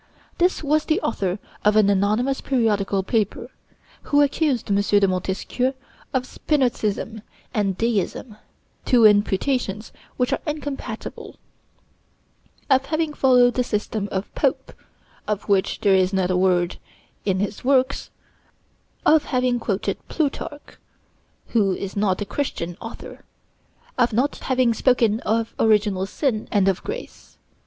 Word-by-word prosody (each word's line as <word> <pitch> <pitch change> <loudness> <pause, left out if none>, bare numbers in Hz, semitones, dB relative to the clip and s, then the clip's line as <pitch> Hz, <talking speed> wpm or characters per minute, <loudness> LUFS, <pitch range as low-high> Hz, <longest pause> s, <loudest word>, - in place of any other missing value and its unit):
This 355 -1 +2
was 305 +1 +1
the 320 +4 +1
author 190 -4 -1 0.3
of 210 0 +4
an 215 -2 +5
anonymous 210 +7 +1
periodical 205 -6 +1
paper, 210 0 -1 0.6
who 290 0 +5
accused 280 -6 0
M. 200 - +3
de 205 -1 +3
Montesquieu 190 +8 -1 0.4
of 260 -2 0
Spinozism 235 -7 -1 0.3
and 195 -3 0
deism 225 0 -2 0.5
(two 240 -3 +4
imputations 210 +1 +2 0.3
which 250 -1 +1
are - - 0
incompatible); 295 -2 -5 1.3
of 265 -1 +3
having 315 -1 -1
followed 250 -3 +4
the 250 - +1
system 210 -2 -2
of 190 +1 -4
Pope - - -1 0.5
(of 210 -2 -2
which 195 -2 +1
there 200 -2 +4
is 185 0 +3
not 190 -2 +1
a - - +1
word 180 -1 +1 0.4
in 190 -2 0
his 205 +1 -3
works); 260 0 +1 1.0
of 310 -1 +5
having 250 -2 +1
quoted 195 -3 -2
Plutarch, 290 -1 -4 0.7
who 200 -5 +2
is 195 -1 -6
not 200 -1 +1
a - - -1
Christian 180 -8 -3
author; 225 - -9 0.8
of 240 -2 +3
not 260 +6 +1
having 255 -3 +1
spoken 230 -2 +2
of 225 +1 -1
original 210 -3 +2
sin 225 0 -1
and 200 -2 +3
of 190 -2 +1
grace. 480 +4 -8
220 Hz, 130 wpm, -22 LUFS, 200-260 Hz, 1.3 s, an